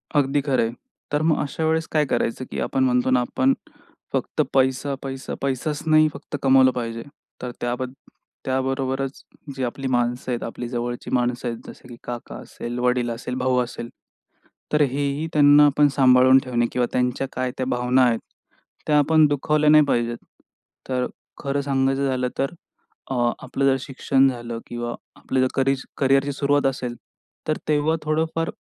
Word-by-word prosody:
अगदी 145 0 +2
खरं 135 -3 +1
आहे. 115 - -2 0.4
तर 145 0 +1
मग 155 - +3
अशा 150 +3 -3
वेळेस 160 0 +1
काय 155 -1 +2
करायचं, 130 -1 -1
की - - -4
आपण 135 - 0
म्हणतो 125 0 +2
ना, 125 - +4
आपण 130 +2 +1 0.6
फक्त - - 0
पैसा, 130 +1 +1
पैसा, 135 -1 -6
पैसाच 140 +3 -2
नाही 155 0 +6
फक्त 145 +1 -8
कमावलं 130 -1 +5
पाहिजे, 115 -2 -4 0.4
तर 125 - -4
त्याबद 125 +1 -2 0.5
त्याबरोबरच 135 +1 -1 0.3
जे 135 - -3
आपली 130 +2 -3
माणसं 125 0 0
आहेत 120 - -2
आपली 120 +1 -5
जवळची 120 0 -4
माणसं 125 -1 0
आहेत, 115 -1 -3
जसे - - -12
की 120 - -10
काका 120 -1 -6
असेल, 120 +1 -6
वडील 125 -1 +1
असेल, 120 +2 -4
भाऊ 130 0 +1
असेल, 120 -1 -7 0.8
तर 150 - +4
हेही 140 +2 0
त्यांना 145 0 +7
आपण 145 +1 +4
सांभाळून 130 -1 +6
ठेवणे 120 -2 0
किंवा 125 -1 +1
त्यांच्या 125 +2 0
काय 130 0 -2
त्या 130 - -1
भावना 125 +1 +2
आहेत, 115 -2 +2 0.7
त्या 150 - +4
आपण 155 +2 +5
दुखावल्या 150 +1 +2
नाही 155 0 +7
पाहिजेत. 120 -3 0 0.7
तर 125 -1 0 0.4
खरं 140 0 -1
सांगायचं 135 0 +1
झालं 130 -1 0
तर, 135 +1 0 0.6
अ, 120 -2 +2
आपलं 135 +1 -1
जर 135 -1 +4
शिक्षण 135 0 +2
झालं 120 -2 -5
किंवा 120 0 -4 0.2
आपलं 130 - -2
जर 130 - +3
करि 135 0 +2 0.2
करिअरची 135 +1 +2
सुरुवात 140 0 +1
असेल, 125 -2 -1 0.5
तर 155 - +1
तेव्हा 155 +1 +2
थोडंफार 160 +2 -1
130 Hz, 165 wpm, -23 LUFS, 125-145 Hz, 0.8 s, त्यांना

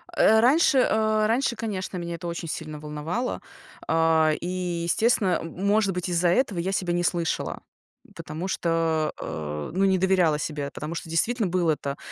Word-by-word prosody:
Э, 220 0 +5
раньше, 270 +3 +4
а, 215 0 +2
раньше, 235 +2 +1
конечно, 200 -5 -4
меня 170 -1 -4
это 175 +1 -7
очень 170 0 -5
сильно 155 -1 -5
волновало. 150 +11 -3 0.5
А, 160 -1 +3
и - - -4 0.4
естественно, 195 +1 +2
м 170 +4 -6
может 205 -1 +2
быть, 180 0 -3
из-за 175 0 +2
этого 195 -1 +1
я 185 +3 -1
себя 180 -3 -1
не 175 0 0
слышала. 170 -2 -1 0.5
Потому 160 +5 -6
что, 165 -3 0
а, 75 -1 -5
ну, 195 +2 +2
не 190 -1 +3
доверяла 180 -5 +2
себе, 145 -2 -4
потому 155 +2 -6
что 165 - -6
действительно 215 +7 +1
был 175 -1 +1
это, 140 -2 -2
175 Hz, 170 wpm, -25 LUFS, 160-200 Hz, 0.5 s, Э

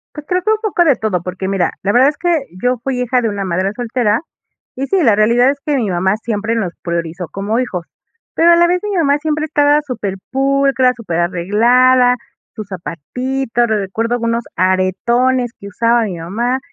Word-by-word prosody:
Pues, 300 - -8
creo 365 0 0
que 435 - +2
un 435 - +3
poco 390 -5 +1
de 285 -5 +4
todo, 200 -6 -2
porque 185 +1 -5
mira, 195 -2 0
la 200 - +1
verdad 255 +5 +5
es 300 - -6
que 335 -5 0 0.2
yo 250 0 +1
fui 255 -2 -2
hija 250 0 +1
de 225 - 0
una 200 -1 -3
madre 185 +2 -1
soltera, 235 -2 0 0.5
y 270 +2 -3
sí, 385 -2 +1
la 220 -5 +4
realidad 235 +5 +4
es 280 - -7
que 295 - 0
mi 220 -6 -1
mamá 190 +3 +1
siempre 225 0 -2
nos 185 -6 -2
priorizó 170 0 -3
como 205 +4 -2
hijos. 180 -9 -3 0.5
Pero 340 +1 +5
a - - +7
la 345 0 +4
vez 360 +1 +1
mi 415 -2 -2
mamá 290 -4 +2
siempre 305 0 -1
estaba 295 -1 +3
súper 210 -8 -4 0.2
pulcra, 270 -1 +2
súper 180 -8 -3
arreglada, 240 +8 +3 0.4
sus 215 -3 -7
zapatitos, 240 - -3
recuerdo 220 +2 -1
algunos 230 0 -1
aretones 235 +7 +1
que 200 - -9
usaba 230 +4 +1
mi 190 -6 -4
mamá, 235 +10 -2
235 Hz, 195 wpm, -16 LUFS, 195-270 Hz, 0.5 s, a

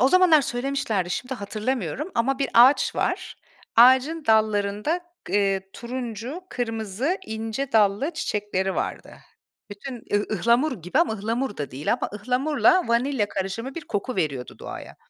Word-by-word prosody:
O 260 - +5
zamanlar 355 -4 +6
söylemişlerdi 245 -8 -2
şimdi 255 +7 -3
hatırlamıyorum 220 - -3
ama 260 +3 +1
bir 275 - 0
ağaç 250 +5 +6
var. - - -2 0.4
Ağacın 260 +6 +5
dallarında 215 - +2 0.2
g - - -8
eee 195 -1 +1
turuncu, 245 - -5
kırmızı, 225 - -2
ince 225 +4 -4
dallı 215 - +3
çiçekleri 205 -8 -2
vardı. - - -4 0.6
Bütün 250 +6 -7 0.2
ıh 205 - +4
ıhlamur 235 - +1
gibi 180 - -1
ama 340 -9 +3
ıhlamur 225 +2 -2
da 145 - -4
değil 135 +4 -1
ama - - -2
ıhlamurla 280 - +2
vanilya 235 -2 +1
karışımı 210 +8 -4
bir 335 - -6
koku 215 +4 -3
veriyordu 140 -8 -2
doğaya. - - -8
235 Hz, 140 wpm, -24 LUFS, 205-270 Hz, 0.6 s, zamanlar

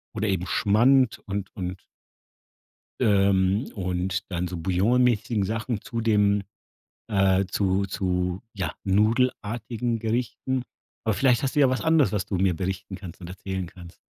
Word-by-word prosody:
oder 110 0 -1
eben 95 -2 -1
Schmand 120 +4 +3
und 100 -1 -4
und 90 -1 -5 1.2
ähm, 100 -1 +3
und 90 -1 -2
dann 90 0 -1
so 90 - -5
bouillon-mäßigen 105 +5 +2
Sachen 110 +1 -2
zu 115 - -4
dem, 105 -2 +3 0.7
äh, 95 -2 +3
zu 95 0 +1
zu 90 -1 -1
ja 95 -6 -3
nudelartigen 115 +2 0
Gerichten. 125 +3 -2 0.4
Aber 110 - +2
vielleicht 125 +3 +3
hast 135 - -1
du - - +3
ja 135 -3 +6
was 130 - -1
anderes, 160 -6 +3
was 100 -3 0
du 100 - -3
mir 90 -2 +2
berichten 95 +2 -4
kannst 90 -3 -10
und 90 - -9
erzählen 95 0 -4
kannst? 85 -1 -13
100 Hz, 145 wpm, -25 LUFS, 95-115 Hz, 1.2 s, ja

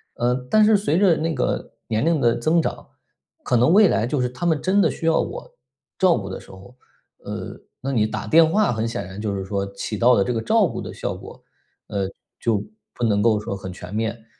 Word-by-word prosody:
呃， 120 +1 +1 0.2
但 215 0 +5
是 215 0 +5
随 180 -5 0
着 190 -3 +4
那 165 +1 -1
个 125 -4 -2
年 110 +1 0
龄 165 0 +2
的 120 -3 +3
增 165 +2 +2
长， - - -4 0.6
可 125 - 0
能 120 +6 +4
未 205 +2 +7
来 115 -8 +1
就 140 +3 -1
是 125 - +1
他 130 +7 -6
们 160 -3 +2
真 195 +2 +3
的 - - +3
需 - - -6
要 165 0 +3
我 - - -5 0.5
照 185 -3 +4
顾 100 -4 -5
的 95 - -6
时 - - -17
候， 95 +6 -14 0.4
呃， - - -7 0.2
那 135 - -3
你 110 -5 +2
打 - - -5
电 160 0 +5
话 210 -3 +2
很 110 0 -1
显 115 - -4
然 95 +2 -8
就 105 -2 -2
是 95 -1 -4
说 100 0 -3
起 100 +2 -4
到 120 +3 +5
了 100 - +3
这 125 - -2
个 115 - -1
照 220 - +3
顾 - - -5
的 - - -7
效 - - -4
果， - - -11 0.5
呃， 100 -2 -2 0.3
就 110 -4 0 0.3
不 - - -5
能 105 -3 +2
够 110 -1 +3
说 105 -1 -4
很 95 -1 -7
全 90 +1 -10
面。 110 +1 -3
120 Hz, 255 characters per minute, -22 LUFS, 105-165 Hz, 0.6 s, 未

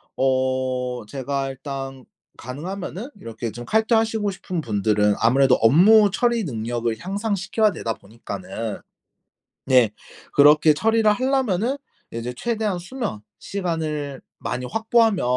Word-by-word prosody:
어 130 -2 0
제가 135 +2 -3
일단 135 -1 -7 0.3
가능하면은 185 - -6
이렇게 115 0 -6
좀 120 +3 -8
칼퇴하시고 220 - +2
싶은 180 -2 -4
분들은 105 -3 +1
아무래도 130 +3 +4
업무 200 - +6
처리 235 +1 +1
능력을 115 -3 -2
향상시켜야 205 - 0
되다 115 - -3
보니까는 115 - -7 0.9
네. 125 -5 +4 0.4
그렇게 150 +2 +6
처리를 220 +5 +3
하려면은 255 0 0 0.3
이제 115 +2 -4
'최대한 215 - -1
수면 210 - -5 0.2
시간을 155 -7 -3 0.2
많이 125 - -3
확보하면 225 - +2
150 Hz, 285 characters per minute, -23 LUFS, -, 0.9 s, 업무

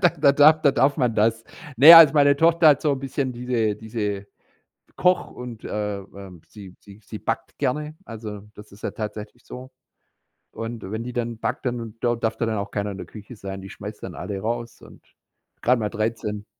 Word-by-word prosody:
da 180 - +5
da 145 -1 +4
darf 155 +2 +5
da 140 - +5
darf 135 +2 +2
man 125 -5 0
das. 110 +1 +1 0.3
Ne, 145 +8 +10
also 165 -2 +9
meine 145 -1 +4
Tochter 165 +1 +4
hat 145 - +4
so 150 - +1
'n 135 - -3
bisschen 135 -1 -3
diese 120 -4 -1
diese 105 -2 -4 0.7
Koch 180 0 +1
und, 120 -3 -9
äh, 105 -1 -3
ähm, 95 -3 -12
sie 95 -4 -13
sie 100 0 -16
sie - - -9
backt - - -4
gerne, 150 +4 -2
also 105 -3 -8
das 105 0 -14
ist 100 +1 -17
ja - - -3
tatsächlich 105 +3 -7
so. 130 +1 -10 0.8
Und 115 -3 -7
wenn 110 +3 -4
die 125 - -6
dann 120 -1 -3
backt, 125 +5 -4
dann 120 -3 -4
da 120 0 0
darf 115 -1 -2
dann 115 - -1
auch 100 -2 -4
keiner 100 0 -3
in 95 - -8
der - - -7
Küche 110 +3 -12
sein, 95 -2 -7
die 95 - -10
schmeißt - - -9
dann - - -7
alle 100 -1 -5
raus 115 +3 -4
und - - -16 0.6
gerade 125 0 +2
mal 105 - -2
13. 110 -1 -3
115 Hz, 200 wpm, -23 LUFS, 105-130 Hz, 0.8 s, Ne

